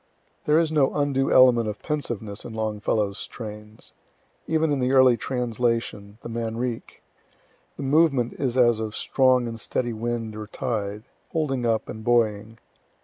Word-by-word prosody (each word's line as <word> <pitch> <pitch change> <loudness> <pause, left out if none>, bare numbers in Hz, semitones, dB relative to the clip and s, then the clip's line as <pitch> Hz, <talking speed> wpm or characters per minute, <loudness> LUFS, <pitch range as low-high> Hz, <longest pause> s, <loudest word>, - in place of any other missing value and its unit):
There 150 +1 +4
is 165 -1 +2
no 145 -4 +2
undue 140 -2 +1
element 120 -3 +6
of 105 - -7
pensiveness 115 -9 -4
in 115 - -8
Longfellow's 105 -2 -1
strains. 105 -1 -8 0.5
Even 160 -1 +1
in 140 - 0
the 130 +1 +1
early 130 -2 +6
translation, 115 -4 -2
the - - -6
Manrique, 115 +1 -4 0.7
the - - -5
movement 140 -4 +3
is 130 -2 -2
as 120 -3 +4
of 110 -1 -4
strong 130 -2 +2
and 115 -1 -6
steady 120 +1 -2
wind 115 -1 -3
or 105 0 -7
tide, 105 -3 -3 0.3
holding 135 -7 0
up 110 -1 0
and 110 - -8
buoying. 110 -2 +1
120 Hz, 145 wpm, -24 LUFS, 110-130 Hz, 0.7 s, element